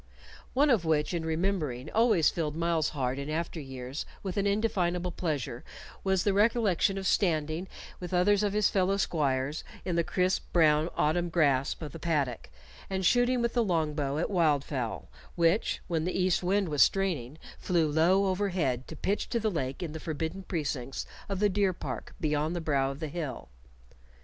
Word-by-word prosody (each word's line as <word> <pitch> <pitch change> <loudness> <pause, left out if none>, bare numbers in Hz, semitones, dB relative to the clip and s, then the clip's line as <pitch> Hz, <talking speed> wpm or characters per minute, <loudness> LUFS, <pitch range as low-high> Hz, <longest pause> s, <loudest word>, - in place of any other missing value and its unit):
One 285 +2 +4
of 220 -8 +3
which, 160 0 +1
in 170 -2 -1
remembering, 160 -5 -1
always 220 -8 +4
filled 155 -3 -2
Myles's 165 -2 +1
heart 130 -2 -1
in 140 +1 -5
after 165 +1 -3
years 135 0 -6 0.2
with 190 -3 -4
an 200 0 +1
indefinable 180 -4 0
pleasure, 145 -8 -3 0.4
was 190 -2 +2
the 200 - +2
recollection 205 -2 +2
of 195 - -4
standing 160 -1 +1 0.3
with 180 0 -6
others 195 +3 +3
of 205 -1 0
his 210 -1 +3
fellow 195 0 +1
squires 145 -5 0 0.2
in 180 - -1
the 170 - +3
crisp 185 +2 0
brown 155 -1 +4
autumn 170 +3 +1
grass 145 -5 +2
of 155 -3 -6
the 165 - -9
paddock, 145 -7 -1 0.4
and 190 -1 -1
shooting 245 +3 +3
with 235 - 0
the 240 - +2
long 165 -6 0
bow 145 -1 -1
at 170 - -1
wildfowl, 145 - 0 0.3
which, 170 +5 +2
when 165 -3 0
the 180 +2 -1
east 185 -1 +2
wind 190 0 +1
was 150 -2 +1
straining, 160 -9 +2 0.2
flew 170 -3 +1
low 170 +6 +3
overhead 180 -10 0
to 160 - -8
pitch 200 +7 -1
to 235 - 0
the 220 -1 0
lake 135 -2 -3
in 165 - -4
the 160 - -6
forbidden 160 +4 -4
precincts 145 -8 -3 0.2
of 195 - -1
the 210 - +4
deer 195 -1 +1
park - - -6
beyond 155 0 0
the - - -1
brow 140 -4 +1
of 135 +1 -6
the 155 - -2
hill. 150 - -5
170 Hz, 180 wpm, -29 LUFS, 150-190 Hz, 0.4 s, One